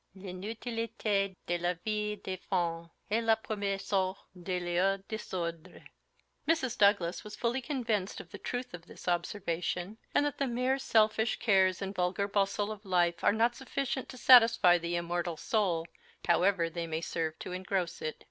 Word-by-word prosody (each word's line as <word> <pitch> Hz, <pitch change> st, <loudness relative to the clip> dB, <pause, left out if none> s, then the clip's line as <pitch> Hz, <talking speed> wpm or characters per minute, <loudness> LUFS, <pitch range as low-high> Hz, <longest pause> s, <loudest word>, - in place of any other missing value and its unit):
"L'inutilité 205 Hz, +1 st, -2 dB
de 175 Hz, 0 st, -1 dB
la 175 Hz, +1 st, 0 dB
vie 210 Hz, -1 st, -1 dB
des 190 Hz, -2 st, -5 dB
femmes 170 Hz, -3 st, -1 dB, 0.2 s
est 225 Hz, +2 st, +2 dB
la 225 Hz, -1 st, +5 dB
premier 205 Hz, -3 st, -2 dB
source 190 Hz, -1 st, 0 dB, 0.2 s
de 180 Hz, +1 st, -3 dB
leurs 180 Hz, +2 st, +1 dB
désordres." 175 Hz, -5 st, -5 dB, 0.7 s
Mrs. 265 Hz, -7 st, +1 dB
Douglas 200 Hz, -4 st, +3 dB
was 210 Hz, 0 st, -8 dB
fully 240 Hz, +2 st, -1 dB
convinced 235 Hz, -8 st, -2 dB
of -, -, -11 dB
the -, -, -8 dB
truth 245 Hz, -2 st, -4 dB
of 170 Hz, -1 st, -9 dB
this -, -, -13 dB
observation, 175 Hz, +2 st, -2 dB, 0.2 s
and 290 Hz, -, +4 dB
that 290 Hz, -, -3 dB
the 275 Hz, -, +1 dB
mere 255 Hz, +2 st, 0 dB
selfish 220 Hz, -2 st, +2 dB
cares 190 Hz, -3 st, +3 dB
and 195 Hz, 0 st, -4 dB
vulgar 180 Hz, +1 st, 0 dB
bustle 200 Hz, +1 st, 0 dB
of 210 Hz, -1 st, -8 dB
life 175 Hz, -3 st, +1 dB
are -, -, +5 dB
not 230 Hz, +3 st, +2 dB
sufficient 265 Hz, 0 st, -3 dB
to 255 Hz, -, -9 dB
satisfy 225 Hz, -9 st, +7 dB
the 170 Hz, +1 st, -2 dB
immortal 170 Hz, -1 st, -2 dB
soul, 180 Hz, -7 st, 0 dB, 0.4 s
however 175 Hz, 0 st, +3 dB
they 165 Hz, 0 st, -4 dB
may 160 Hz, 0 st, -2 dB
serve 160 Hz, -2 st, -2 dB
to -, -, -7 dB
engross 185 Hz, -1 st, -2 dB
it. 155 Hz, -, -3 dB
195 Hz, 165 wpm, -31 LUFS, 175-220 Hz, 0.7 s, satisfy